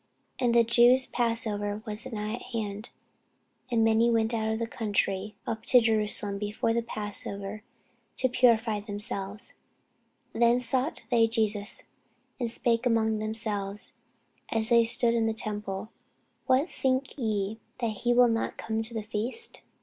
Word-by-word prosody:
And 240 -2 +2
the 235 - +7
Jews' 240 +3 +5
passover 215 -4 0
was 215 +3 -5
nigh 215 -3 -4
at 240 - -5
hand: 210 -1 -4 0.8
and 230 -2 +2
many 225 +1 +4
went 225 0 +2
out 220 -1 0
of 220 - -1
the 230 - -1
country 210 -2 -1
up 225 -1 -4
to 250 - +7
Jerusalem 210 -3 +2
before 210 +2 -1
the 235 - +1
passover, 205 -2 -5 0.6
to 260 - +2
purify 230 -4 +3
themselves. 205 +1 -5 0.8
Then 235 +1 +4
sought 255 +4 -1
they 230 -2 +5
for 225 - -11
Jesus, 210 -2 0 0.6
and 240 -2 -1
spake 235 +1 +1
among 220 -2 +2
themselves, 210 -2 -3 0.6
as 220 0 0
they 235 -1 +5
stood 235 +1 +2
in 230 -1 +2
the 220 - -1
temple, 210 -1 -4 0.6
What 265 +4 +3
think 260 -4 -1
ye, 215 -4 -2 0.2
that 225 -4 -2
he 240 - 0
will 245 0 +6
not 225 -1 -1
come 220 0 -2
to 225 +1 -4
the 220 - -2
feast? 230 - -2
225 Hz, 150 wpm, -28 LUFS, 210-235 Hz, 0.8 s, the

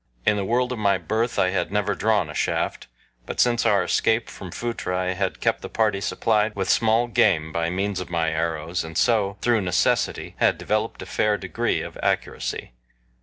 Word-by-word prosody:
In 105 - +4
the 100 - -1
world 125 +5 +1
of 125 - -3
my 100 -2 +3
birth 110 +7 -1
I 90 - +3 0.2
never 105 +1 0
had 100 - -4
drawn 105 -6 +2
a 75 - -8
shaft, - - -1 0.4
but - - -5
since 120 -1 +3
our - - +3
escape 110 +1 +1
from 95 - -9
Phutra 115 -3 -3
I 90 0 0
had 95 0 -2
kept - - 0
the - - -7
party 105 -3 +1
supplied 105 +1 +1
with 95 -1 0
small 115 +1 +3
game 90 -9 +2
by 85 +1 -1
means 95 +2 -1
of 90 - -6
my 85 -2 0
arrows, 80 +1 -2
and 80 0 -7
so, 100 -4 +2
through 120 -3 +3
necessity, 90 -11 0
had - - +3
developed 110 +1 -2
a - - -9
fair 105 -1 +1
degree - - -1
of - - -9
accuracy. - - -2
100 Hz, 195 wpm, -24 LUFS, 90-110 Hz, 0.4 s, In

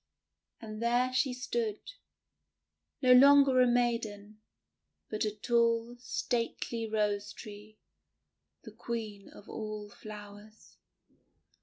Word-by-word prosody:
And 215 -1 -8
there 245 +2 +1
she 260 +1 +2
stood, 235 -4 -2 1.2
no 255 - +5
longer 275 0 +7
a 250 - +5
maiden, 220 -4 -1 0.7
but 215 0 -1
a 210 - -1
tall, 230 +2 +1
stately 235 -2 -2
Rose 210 -1 -1
Tree, 210 0 -11 0.9
the - - -10
Queen 215 -4 -6
of 205 - -15
all 215 -1 -6
flowers. 210 0 -12
225 Hz, 100 wpm, -31 LUFS, 210-240 Hz, 1.2 s, longer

